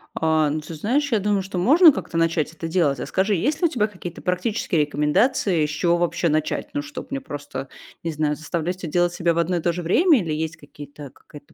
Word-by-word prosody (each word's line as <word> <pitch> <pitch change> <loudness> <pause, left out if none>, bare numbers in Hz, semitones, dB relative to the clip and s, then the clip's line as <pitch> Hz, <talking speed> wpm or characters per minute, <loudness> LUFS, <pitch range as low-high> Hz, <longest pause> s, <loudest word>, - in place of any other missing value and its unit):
А, 160 -2 +2
ну 155 - -2
ты 155 +2 -9
знаешь, 265 - 0
я 220 - +3
думаю, 205 0 +1
что 190 0 -6
можно 305 - +7
как-то 180 -5 -5
начать 165 -2 +1
это 165 0 -6
делать. 160 -6 +1
А - - -3
скажи, 195 +2 0
есть 285 - -1
ли 345 - +5
у - - -5
тебя 225 -8 0
какие-то 180 -4 -9
практические 180 -2 0
рекомендации, 155 - +1
с - - -4
чего 170 +3 +1
вообще 175 0 0
начать? 155 -1 -1
Ну, 290 - -1
чтоб 295 -3 -9
мне 275 0 -3
просто, 145 - -7 0.3
не 165 - -2
знаю, 150 -1 -1
заставлять 165 +4 -3
всё 180 -2 -6
делать 175 +2 +1
себя 170 -1 +1
в 165 - -5
одно 175 +2 +1
и - - -2
то 170 +1 +1
же 175 +1 -5
время, 300 - +4
или 165 -6 -3
есть 160 +1 -3
какие-то 145 -1 -11
какая-то 145 -1 -16
170 Hz, 235 wpm, -22 LUFS, 155-200 Hz, 0.3 s, можно